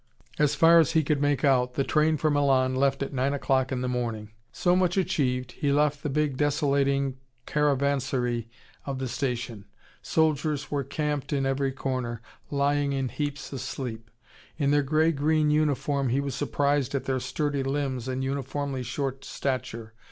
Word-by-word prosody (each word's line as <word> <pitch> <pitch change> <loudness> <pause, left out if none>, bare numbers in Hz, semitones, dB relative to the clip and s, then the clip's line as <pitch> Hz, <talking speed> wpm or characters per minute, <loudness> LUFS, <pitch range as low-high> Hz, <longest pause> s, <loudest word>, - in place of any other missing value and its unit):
As 150 -1 +3
far 165 +1 +7
as 165 0 +3
he 160 -1 +3
could 145 0 0
make 145 -1 +2
out, 125 -2 +2
the 135 - +1
train 155 +2 +2
for 155 +2 +1
Milan 135 -3 +2
left 135 +1 +1
at 140 - -6
9:00 135 0 +1
in 130 -1 -1
the 125 - -1
morning. 115 -4 -3 0.2
So 180 0 +2
much 180 0 +2
achieved, 130 -9 0
he 140 +2 -1
left 145 0 +2
the 150 - -2
big 145 -1 0
desolating 140 -2 +1 0.3
caravanserai 135 -5 0 0.4
of 135 -1 -2
the 130 0 -3
station. 120 -4 -3 0.4
Soldiers 155 -2 0
were 145 -1 0
camped 150 0 -3
in 140 -2 +1
every 135 0 0
corner, 130 -3 -3 0.3
lying 140 0 +1
in 135 -2 -1
heaps 145 +3 -4
asleep. 125 -3 -5 0.5
In 140 -2 +1
their 145 0 +4
grey 155 +3 +2
green 155 0 +2
uniform, 145 -2 +1
he 130 +4 +1
was 140 -1 -2
surprised 140 0 0
at 135 -1 -2
their 130 -1 0
sturdy 145 +2 -1
limbs 135 -2 -2
and 130 0 -2
uniformly 135 0 -3
short 135 +2 -3
stature. 115 -4 -4
140 Hz, 165 wpm, -27 LUFS, 130-145 Hz, 0.5 s, far